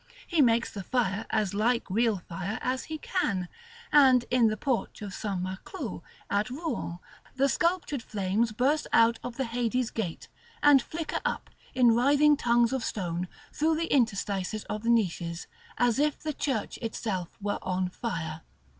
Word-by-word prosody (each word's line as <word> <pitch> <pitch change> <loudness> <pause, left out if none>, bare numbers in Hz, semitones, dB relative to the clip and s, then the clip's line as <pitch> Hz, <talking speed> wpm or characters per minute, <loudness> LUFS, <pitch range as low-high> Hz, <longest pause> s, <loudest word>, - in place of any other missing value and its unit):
He 335 -4 +2
makes 235 -3 +3
the 200 - -5
fire 220 -1 -1
as 210 -4 0
like 230 +4 +1
real 220 +2 +2
fire 190 +4 -5
as 255 +1 -1
he 315 - -5
can; 200 - -1 0.4
and 260 -4 +6
in 245 -2 +5
the 215 0 0
porch 245 -3 -2
of 200 -2 -6
St. 195 -2 -3
Maclou 185 - -5 0.3
at 205 +4 0
Rouen 260 - -4 0.4
the 270 +1 +3
sculptured 335 -3 0
flames 210 +2 0
burst 270 +8 +1
out 230 +1 +5
of 245 -1 -6
the 265 - 0
Hades 240 +1 -1
gate, 190 -8 -4 0.4
and 290 -2 +7
flicker 315 +6 -4
up, - - -3 0.2
in 245 -2 +6
writhing 285 +5 +5
tongues 235 -2 +3
of 260 -3 -1
stone, 180 -3 -2 0.3
through 315 +2 +2
the 330 +1 -1
interstices 210 -4 0
of 210 - -4
the 230 - -1
niches, 175 -7 0 0.3
as 245 +1 +2
if 300 0 +2
the 310 -1 -4
church 265 -7 -2
itself 210 -6 -4
were 205 0 -2
on 185 0 -1
fire. 165 -6 -4
230 Hz, 165 wpm, -28 LUFS, 200-265 Hz, 0.4 s, and